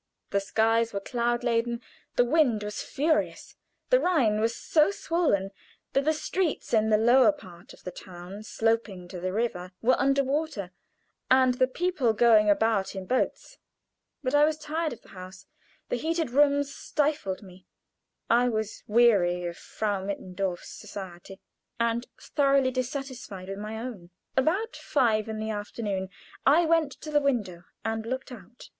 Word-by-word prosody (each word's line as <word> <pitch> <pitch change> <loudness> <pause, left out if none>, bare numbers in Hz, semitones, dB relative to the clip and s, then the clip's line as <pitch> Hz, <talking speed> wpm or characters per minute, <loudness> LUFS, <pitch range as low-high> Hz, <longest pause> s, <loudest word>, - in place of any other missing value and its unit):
The 200 - +2
skies 225 +3 +1
were 200 - -1
cloud 240 +3 -1
laden, 235 0 0 0.4
the 245 - +4
wind 245 -6 +2
was 210 0 -4
furious. 310 +3 -1 0.4
The - - +6
Rhine 255 - +2
was 230 +1 +1
so 310 +1 +3
swollen 330 - 0 0.4
that 275 +1 +2
the 310 - +4
streets 325 -1 -2
in 220 -1 +3
the 215 - +5
lower 245 +6 +6
part 180 - -14
of - - -16
the 180 - -5
town 180 +3 -10
sloping 220 -4 -1
to 180 - -7
the 185 +1 -2
river 185 -4 -2
were 250 +3 +3
under 275 0 +3
water, 270 - -2 0.6
and 260 -1 +5
the 255 +1 +2
people 280 -5 0
going 215 -2 +5
about 205 -1 +2
in 190 -1 -5
boats. 260 - -2 0.6
But 255 0 -1
I 290 0 +6
was 310 0 +2
tired 315 +1 -2
of 240 - -10
the - - -19
house; 185 +1 -11 0.4
the - - 0
heated 320 +1 -1
rooms 285 +1 +3
stifled 290 -13 -1
me. 185 -1 -15 0.6
I 245 +2 +4
was 220 -2 -3
weary 200 -6 +4
of 170 0 -4
Frau 205 -1 -3
Mittendorf's 190 -2 -4
society, 190 0 -9 0.4
and 235 +1 0
thoroughly 275 -3 +2
dissatisfied 255 -7 -5
with 195 0 -5
my 215 +1 -5
own. 220 -7 -7 0.3
About 345 +12 +1
five 225 -6 +1
in 220 - -4
the 220 0 -3
afternoon 205 -2 -3 0.3
I 320 +5 +5
went 320 -3 +2
to 305 - -7
the 295 -1 +3
window 210 -11 -1 0.2
and 225 0 -1
looked 260 +3 -4
out. 235 0 -12
230 Hz, 160 wpm, -27 LUFS, 200-275 Hz, 0.6 s, The